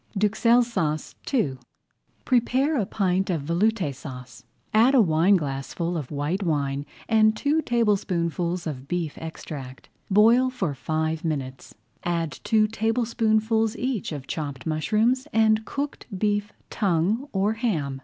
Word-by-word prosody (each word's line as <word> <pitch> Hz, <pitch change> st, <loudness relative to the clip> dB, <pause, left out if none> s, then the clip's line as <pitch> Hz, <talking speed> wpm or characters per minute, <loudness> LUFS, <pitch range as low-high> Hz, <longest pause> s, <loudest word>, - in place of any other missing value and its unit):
DUXELLES 230 Hz, +4 st, +3 dB
SAUCE 165 Hz, -10 st, -2 dB, 0.2 s
II 145 Hz, -, 0 dB, 0.7 s
Prepare 260 Hz, +4 st, +2 dB
a 215 Hz, -8 st, 0 dB
pint 190 Hz, -2 st, 0 dB
of 165 Hz, -6 st, -1 dB
Veloute 175 Hz, 0 st, +1 dB
Sauce, 125 Hz, -2 st, -10 dB, 0.3 s
add 235 Hz, +6 st, +5 dB
a -, -, +6 dB
wineglassful 165 Hz, -, +1 dB
of 150 Hz, -6 st, -4 dB
white 150 Hz, +6 st, -2 dB
wine 145 Hz, -5 st, -1 dB, 0.2 s
and 215 Hz, -1 st, +4 dB
two 295 Hz, +5 st, +1 dB
tablespoonfuls 180 Hz, -, 0 dB
of 135 Hz, -4 st, -5 dB
beef 170 Hz, -3 st, -2 dB
extract. 140 Hz, -5 st, -8 dB, 0.2 s
Boil 230 Hz, +6 st, +5 dB
for 190 Hz, -, -2 dB
five 155 Hz, +3 st, -2 dB
minutes, 135 Hz, -5 st, -4 dB, 0.3 s
add 170 Hz, -3 st, -1 dB
two 215 Hz, -1 st, +3 dB
tablespoonfuls 225 Hz, 0 st, +1 dB
each 255 Hz, -8 st, -2 dB
of 145 Hz, -4 st, -6 dB
chopped 140 Hz, -3 st, -5 dB
mushrooms 215 Hz, -, +1 dB
and 220 Hz, 0 st, +3 dB
cooked 285 Hz, +4 st, -4 dB
beef 205 Hz, +1 st, 0 dB, 0.2 s
tongue 205 Hz, -, 0 dB
or 200 Hz, +2 st, +1 dB
ham. 160 Hz, -, -2 dB
190 Hz, 125 wpm, -25 LUFS, 155-225 Hz, 0.7 s, a